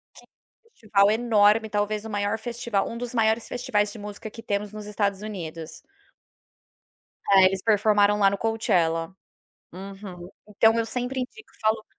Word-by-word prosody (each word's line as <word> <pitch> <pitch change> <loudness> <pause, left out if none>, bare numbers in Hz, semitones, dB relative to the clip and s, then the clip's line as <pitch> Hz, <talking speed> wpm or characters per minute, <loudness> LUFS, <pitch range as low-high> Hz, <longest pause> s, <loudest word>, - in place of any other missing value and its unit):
que - - -15
é - - -24
um 460 - -37
festival 205 -2 +2
enorme, 220 -1 +3
talvez 210 +1 -1
o 220 - -7
maior 205 +1 -1
festival 235 -2 -2
um 235 - -6
dos 245 0 -5
maiores 220 0 +2
festivais 210 -4 -1
de 220 - -10
música 205 +1 -8
que 230 - -11
temos 205 -1 -3
nos 210 -1 -8
Estados 200 -1 -1
Unidos. 165 -6 -6 1.6
É, 195 -1 +7
eles 190 0 0
performaram 210 -1 +3
lá 195 -1 +5
no 200 - -3
Coachella. 180 -7 0 0.6
Uhum. 190 -1 -9 0.2
Então, 220 +2 +4
eu 230 - +1
sempre 250 +3 -3
indico 425 - -8
e - - -29
falo: 220 0 +1
210 Hz, 165 wpm, -25 LUFS, 200-225 Hz, 1.6 s, É